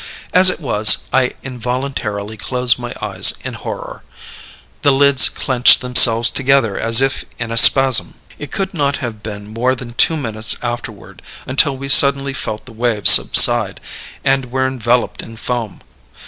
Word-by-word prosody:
As 185 +1 +5
it - - -5
was, 110 -8 +3
I 130 -1 0
involuntarily 125 -4 -6
closed 125 +4 -1
my 120 0 -8
eyes - - +3
in - - -7
horror. - - -9 0.8
The 140 - +2
lids 135 -2 +4
clenched 130 -2 +2
themselves 120 -2 +3
together 130 -6 -1
as 115 +2 +1
if 135 0 -2
in 120 -1 -7
a - - -4
spasm. 130 +1 +3 0.2
"It 150 - -9
could 195 0 -5
not 140 -4 -2
have 115 -6 -8
been 105 -2 -10
more 120 +4 -3
than 120 -2 -11
two 160 +6 +2
minutes 110 -6 -3
afterward 120 -3 -8 0.2
until 135 +1 0
we 135 +1 -9
suddenly 140 0 +4
felt 110 -4 -7
the 125 - -14
waves 115 -2 +3
subside, - - +4 0.4
and 135 -1 -1
were 130 0 -2
enveloped 125 -2 -3
in 115 0 -13
foam. 115 -2 -6
125 Hz, 155 wpm, -14 LUFS, 115-135 Hz, 0.8 s, As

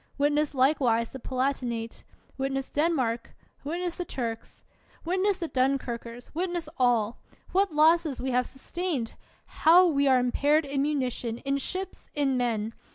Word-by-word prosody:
) - - -34
Witness 290 +1 +1
likewise 255 -4 +2
the 265 - -8
Palatinate! 250 -3 -2 0.3
Wit 270 0 -2
ness 270 0 -3
Denmark! 265 -7 0 0.3
Witness 340 +4 -3
the 360 - -2
Turks! 230 -8 -5 0.4
Witness 375 +3 +1
the 340 -3 -3
Dunkirkers! 250 -3 -2
Witness 345 0 -2
all! 240 -3 +2 0.3
What 390 0 +2
losses 310 -1 +3
we 260 +1 -2
have 250 0 +1
sustained! 280 -3 -3 0.3
How 350 +3 +5
we 280 -5 +2
are 260 -1 +5
impaired 290 +5 +2
in 275 0 -1
munition, 255 -5 -1
in 275 +2 -1
ships, 375 +6 -6
in 280 -3 +1
men 225 -3 -1
275 Hz, 145 wpm, -27 LUFS, 245-320 Hz, 0.4 s, How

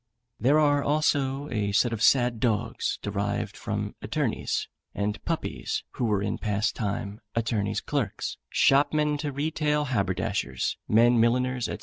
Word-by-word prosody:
There 140 +7 +4
are 145 -2 +3
also 145 -2 +1
a 105 -3 0
set 120 +3 +3
of 110 - -4
sad 120 -2 +4
dogs 115 -1 0
derived 100 +1 -2
from 105 -2 -3
attornies; - - -1 0.3
and 105 +1 -2
puppies, - - -2
who 125 - -2
were 105 -3 +1
in 100 - -2
past 105 +2 0
time 100 0 -3
attornies' 110 -3 -1
clerks, 135 -9 -2
shopmen 145 +1 +3
to 150 -1 -2
retail 150 +1 0
haberdashers, 95 - -1
men 120 +2 +5
milliners, 125 +1 +2
&c. - - -3
115 Hz, 135 wpm, -27 LUFS, 105-140 Hz, 0.3 s, men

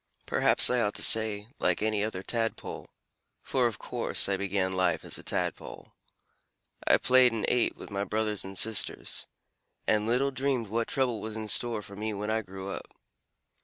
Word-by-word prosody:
Perhaps - - +4
I 125 -1 +2
ought 105 -2 0
to - - +1
say, 110 -2 +3
'like 90 +3 +1
any 110 -1 +1
other 100 -4 -3
Tadpole,' 115 0 -2 0.5
for, 125 -2 +1
of 110 -3 -4
course, - - 0
I 100 - +1
began 95 -1 -1
life 95 -1 0
as - - -5
a - - -11
Tadpole. - - -4 0.9
I - - +6
played 130 -1 +5
and 110 -2 -1
ate 125 -1 +1
with - - -10
my 100 0 -1
brothers 105 0 0
and 95 0 -6
sisters, 110 +1 +1 0.6
and 105 0 +1
little 130 +4 +2
dreamed 130 -5 -1
what 115 +2 -1
trouble 125 -6 0
was 110 0 -6
in 110 -1 -5
store 115 -1 +1
for 100 - -11
me 105 +1 -3
when 105 +2 -3
I 110 0 +1
grew 95 -1 -7
up. - - -6
110 Hz, 180 wpm, -29 LUFS, 100-115 Hz, 0.9 s, I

